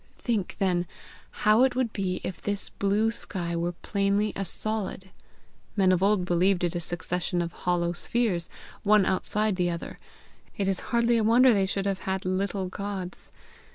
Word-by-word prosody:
Think 220 -7 -1
then 180 -3 +1 0.6
how 215 +2 +6
it 260 -2 +2
would 250 -3 0
be 185 -2 -2
if 185 - -5
this 205 0 -3
blue 205 +3 +1
sky 175 -6 -4
were 170 +1 -1
plainly 200 +3 0
a 195 - -2
solid. 195 -1 -4 0.6
Men 190 -3 +4
of 185 -1 +2
old 200 -2 +3
believed 180 +1 +2
it 175 - +1
a 175 - -1
succession 175 +1 -2
of 170 -1 -1
hollow 175 0 0
spheres, 185 -3 -1 0.3
one 210 -1 +5
outside 210 +2 0
the 180 -1 +1
other; 170 -1 -5 0.6
it 200 - 0
is 195 -1 +1
hardly 235 -1 +3
a 225 - +2
wonder 240 +3 +6
they 195 -2 +2
should 195 0 -2
have 195 -1 0
had 190 0 -3
little 190 +1 -1
gods. 195 -1 -5
195 Hz, 170 wpm, -27 LUFS, 180-210 Hz, 0.6 s, how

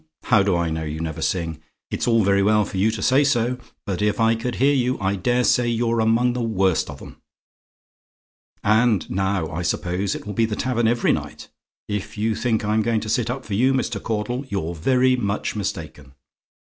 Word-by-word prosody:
How 110 -4 +4
do 100 -2 +2
I 85 -1 0
know 80 0 -3
you 75 0 -5
never 80 -1 -4
sing? 80 -4 -2 0.3
It's - - -2
very 100 -4 +3
well 105 +1 +3
for 95 - -6
you 100 +4 +3
to 110 -3 -3
say 130 +3 +4
so; 125 -2 +1 0.3
but 100 -1 -3
if 105 +2 +1
I 115 0 +4
could 115 +2 -3
hear 140 +3 +3
you, 130 -1 0
I 95 +1 0
daresay 120 +4 +2
you're 115 0 0
among 115 +2 +2
the 125 - -3
worst 95 -6 +1
of - - -9
'em. - - -13 1.4
"And 110 0 +3
now, 95 -3 -1
I 85 +2 -3
suppose, 90 +2 -1
it - - -8
will 105 - -5
be 115 +3 +2
the 110 -1 -3
tavern 120 -2 0
every 120 +1 +2
night? - - -6 0.4
If 105 +1 -4
you 110 +2 0
think 110 -1 -1
I'm 105 +1 +2
going 115 0 0
to 110 - -5
sit 115 +1 0
up 130 +2 -4
for 105 - -5
you, 130 +6 +3
Mr. 130 - -1
Caudle, 115 +4 -2
you're 85 -5 -2
very 130 +9 +2
much 105 -4 -2
mistaken. 75 -8 -5
110 Hz, 200 wpm, -22 LUFS, 95-120 Hz, 1.4 s, How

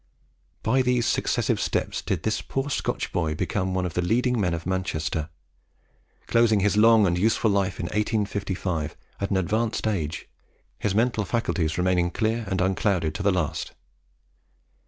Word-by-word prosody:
By 130 +4 +3
these 125 -2 +1
successive - - +1
steps - - -1
did - - -2
this - - 0
poor 135 +2 -3
Scotch - - -2
boy 80 -3 -1
become 95 +3 -1
one 90 -1 0
of 90 - -4
the 90 - 0
leading 120 +5 +1
men 90 -3 +1
of 85 - -7
Manchester, 80 -4 -2 1.0
closing 115 -3 +3
his 105 +1 +2
long 110 0 +6
and 85 -2 +2
useful 110 +2 +2
life 100 -2 0
in - - -2
1855 100 -5 -2 0.2
at 100 - -2
an 100 - +1
advanced 110 +6 0
age, 85 -9 -2 0.5
his 100 -2 -1
mental 115 -1 +2
faculties 90 -7 -1
remaining 90 -1 +2
clear 110 +4 -1
and 95 -1 0
unclouded 95 -4 +1
to 75 - -4
the 100 0 +3
last. 90 -5 -2
100 Hz, 155 wpm, -25 LUFS, 90-110 Hz, 1.0 s, long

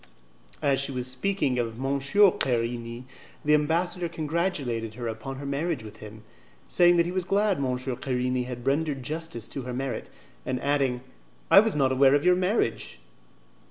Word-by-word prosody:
As 140 -2 +2
she 140 - -1
was 125 -2 -3
speaking 130 0 -1
of 115 -2 -2
M. 135 +2 -1
Querini, 120 - +1 0.4
the 150 - +4
ambassador 170 +3 +1
congratulated 150 - -2
her 120 0 -5
upon 110 +4 -5
her 140 +1 -7
marriage 140 -1 -2
with 105 0 -11
him, 110 0 -11 0.4
saying 175 -1 +5
that 170 - +4
he 175 - -3
was 185 0 -1
glad 200 +2 +1
M. 140 - -1
Querini 125 0 -2
had 125 -1 -7
rendered 140 -1 0
justice 155 -6 -5
to 135 - -4
her 125 0 -6
merit, 135 0 -4 0.3
and 130 -1 -2
adding, 135 -4 +1 0.5
"I - - +10
was 220 -3 +2
not 135 -3 +2
aware 135 +1 +5
of 145 - 0
your 180 0 +6
marriage." 185 - -1
135 Hz, 165 wpm, -26 LUFS, 125-165 Hz, 0.5 s, I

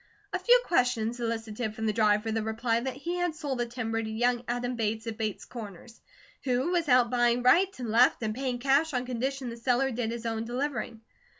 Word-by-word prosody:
A - - 0
few - - +6
questions 245 -6 +1
elicited 225 -1 -3
from 220 - -3
the 215 - +1
driver 215 0 +2
the 225 0 0
reply 225 +1 0
that 255 +2 -4
he 340 +6 -4
had 355 -3 -1
sold 285 -5 -3
the 240 - 0
timber 225 -2 -2
to 220 - -4
young 240 +2 +1
Adam 245 +1 -2
Bates 220 0 -2
of 225 -1 -4
Bates 215 -2 -3
Corners, 225 -1 -10 0.4
who 260 +5 0
was 340 -4 0
out 250 -1 +5
buying 240 0 +2
right 350 +10 +5
and 240 -4 -4
left 240 +1 +4
and 215 -1 -1
paying 255 0 -2
cash 275 +4 +2
on 250 0 -1
condition 255 +1 -3
the 230 - -8
seller 250 +3 +1
did 235 -1 -2
his 235 0 -5
own 225 -1 -2
delivering. 240 -2 -3
240 Hz, 210 wpm, -28 LUFS, 225-255 Hz, 0.4 s, few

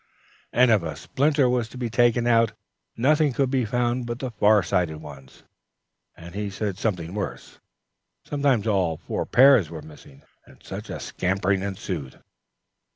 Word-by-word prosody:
and 125 0 +4
if 110 -3 +4
a 80 -3 -5
splinter 140 - +1
was 125 -2 0
to - - -11
be 125 -1 -2
taken 120 +1 +2
out, 115 -2 +3 0.4
nothing 150 +4 +3
could 135 0 0
be 130 -3 +1
found 120 +2 -1
but 120 0 -4
the 130 -1 -5
far 105 -2 +4
sighted 85 -2 0
ones, 70 -4 -13 0.7
and 85 +1 -11
he 105 +1 -3
said 100 0 -3
something 90 -4 -3
worse: 105 -1 -6 0.7
sometimes 140 -7 +1
all 95 -7 +1
four - - -4
pairs 130 - +6
were 80 -3 -8
missing, 75 -3 -15 0.2
and - - -20
such - - -8
a - - -5
scampering 95 +1 -1
ensued! 95 -8 -5
110 Hz, 155 wpm, -24 LUFS, 90-125 Hz, 0.7 s, pairs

